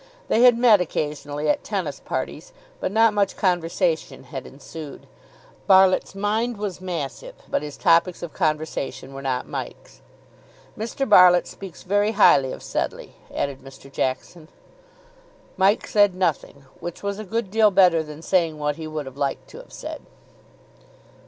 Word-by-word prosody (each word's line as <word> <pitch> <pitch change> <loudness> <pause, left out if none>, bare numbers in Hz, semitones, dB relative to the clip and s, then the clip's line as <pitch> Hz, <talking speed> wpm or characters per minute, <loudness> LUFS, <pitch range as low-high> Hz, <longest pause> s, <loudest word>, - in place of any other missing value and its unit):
They 225 - +3
had 245 -1 +7
met 230 -5 +5
occasionally 150 -2 -3
at - - +1
tennis 180 -9 -3
parties, - - -5 0.3
but - - -2
not 225 +1 +4
much 200 -2 +1
conversation 175 -2 0
had 135 -4 -8
ensued. 145 +1 -10 0.6
Barlitt's 190 0 +4
mind 215 +4 -1
was 200 -3 -5
massive, 185 - -5
but - - -1
his 150 -1 -8
topics 170 +2 +2
of 165 -4 -6
conversation 155 -5 -2
were 135 - -7
not 130 -2 -2
Mike's. - - -8 0.7
"Mr. 235 +5 -3
Barlitt 180 -3 +7
speaks 190 -4 -10
very 205 +3 +1
highly 135 -10 +5
of - - -8
Sedleigh," - - -4 0.2
added 140 -1 -3
Mr. 135 +1 -14
Jackson. 155 +5 -3 1.1
Mike 195 +2 +2
said 205 -3 +3
nothing, 155 -6 -2
which 175 +2 -7
was 200 0 -3
a - - -5
good 215 0 -3
deal 220 0 +5
better 180 -4 +4
than 150 0 -10
saying 165 -5 +1
what 150 -1 -2
he 160 -1 -6
would 155 -2 -5
have 135 0 -10
liked 140 -1 -2
to - - -12
have - - -15
said. - - -7
175 Hz, 150 wpm, -23 LUFS, 150-205 Hz, 1.1 s, had